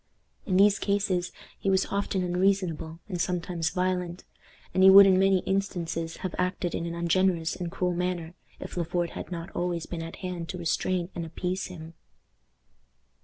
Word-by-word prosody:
In 185 -3 +2
these 200 0 +5
cases 195 -3 0 0.3
he 195 - -1
was 190 0 +3
often 200 -1 0
unreasonable, 180 -3 0
and 180 -4 -3
sometimes 175 -2 -1
violent; 180 0 -2 0.5
and 185 - +2
he 190 - +9
would 195 +1 +10
in 190 -1 +5
many 190 -1 +4
instances 170 -4 -2
have 185 - -3
acted 180 -1 -1
in 170 - -2
an 170 - -4
ungenerous 170 -1 +1
and 175 -2 -5
cruel 180 0 -1
manner 175 -1 -2 0.3
if - - -8
Le 175 - 0
Fort 175 0 -1
had - - -7
not 170 +2 -5
always 175 -2 -2
been 170 -2 -5
at 165 0 -7
hand 175 -2 -4
to 180 - -4
restrain 175 +1 -1
and 170 - -4
appease 180 +3 -3
him. 165 -2 -10
180 Hz, 170 wpm, -27 LUFS, 170-190 Hz, 0.5 s, would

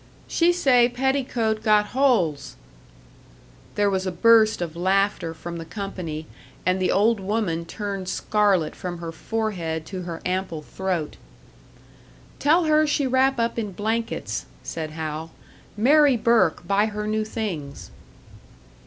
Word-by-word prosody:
"She 340 +1 +3
say 255 -8 +4
petticoat 245 -4 0
got 210 -1 +3
holes!" 220 - +1 1.2
There 205 0 +2
was 190 -1 0
a - - -1
burst 220 +4 +5
of 170 -2 -4
laughter 190 -1 +1
from 170 +1 -7
the 165 - -6
company, 170 -5 -6 0.4
and 185 +1 +1
the 185 - +2
old 215 +3 +3
woman 190 -4 -1
turned 195 -1 -5
scarlet 200 -7 +1
from 175 -1 -5
her 170 -1 -6
forehead 170 -5 -3
to 185 -2 -6
her 170 -2 -6
ample 180 -4 -2
throat. 180 -3 -3 1.2
"Tell 325 +5 +4
her 310 -1 +3
she 290 -1 +1
wrap 265 0 +2
up 230 0 0
in 210 -4 -4
blankets," 225 +4 -3 0.2
said 160 -1 -5
Hal. 155 0 -5 0.5
"Mary 280 +3 +5
Burke 220 -8 +2
buy 200 +2 +3
her 210 0 -4
new 215 0 0
things." 195 -11 -5
205 Hz, 135 wpm, -24 LUFS, 175-230 Hz, 1.2 s, burst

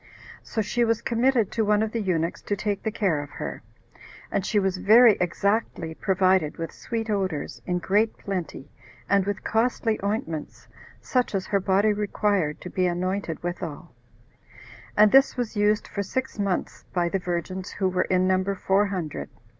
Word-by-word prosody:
So 220 - -3
she 240 +4 0
was 230 -1 +2
committed 235 -2 +2
to 225 - 0
one 210 0 +3
of 220 - -2
the 230 - -2
eunuchs 170 -4 -1
to 205 - -2
take 205 -1 -2
the 220 - -2
care 185 -9 0
of 145 - -8
her; - - -5 0.7
and 195 - 0
she 210 - 0
was 190 -2 +1
very 220 +3 +7
exactly 180 -2 0
provided 185 -3 +2
with 165 -1 -4
sweet 225 -1 -4
odors, 190 -8 -2
in 180 -1 +1
great 205 +5 +1
plenty, 175 -7 -5 0.4
and 195 -1 +2
with 205 -1 -3
costly 225 0 +1
ointments, 200 - -3 0.3
such 250 -5 0
as 190 - -1
her 200 - +1
body 200 +3 +2
required 205 -6 0
to 180 - -7
be 185 -2 +1
anointed 180 -1 -2
withal; 170 -3 -5 1.0
and 210 0 +7
this 270 0 +5
was 240 -3 -3
used 210 0 +2
for 200 - -3
six 260 +3 -3
months 195 -3 -2
by 175 -1 +2
the 195 +3 -1
virgins, 180 +1 -4
who 190 - 0
were 185 0 +1
in 185 0 +3
number 190 +1 +1
four 195 +2 +2
hundred. 180 -7 -4
195 Hz, 170 wpm, -25 LUFS, 180-215 Hz, 1.0 s, very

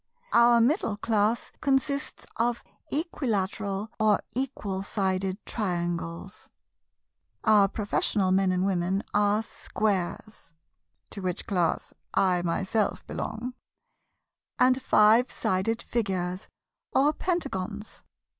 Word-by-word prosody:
Our 235 0 +6
Middle 235 - +1
Class 215 +1 0
consists 280 +1 0
of 235 +1 0 0.3
Equilateral 215 - -2
or 215 -2 +4
Equal 220 -7 -2
Sided 190 -1 -1
Triangles. 175 -2 -3 0.9
Our 210 -3 +6
Professional 200 -1 0
Men 190 0 +3
and 185 0 +1
Gentlemen 190 0 0
are 205 +1 +3
Squares 205 -4 -3 0.6
(to 200 - -6
which 180 -2 -3
class 175 -5 0 0.2
I 180 -2 +3
myself 190 +5 -1
belong) 230 +3 -4 1.0
and 255 +1 +4
Five 225 +1 +5
Sided 195 +5 -1
Figures 185 -4 -2 0.4
or 290 +3 +3
Pentagons. 220 - -3
205 Hz, 95 wpm, -27 LUFS, 190-235 Hz, 1.0 s, Our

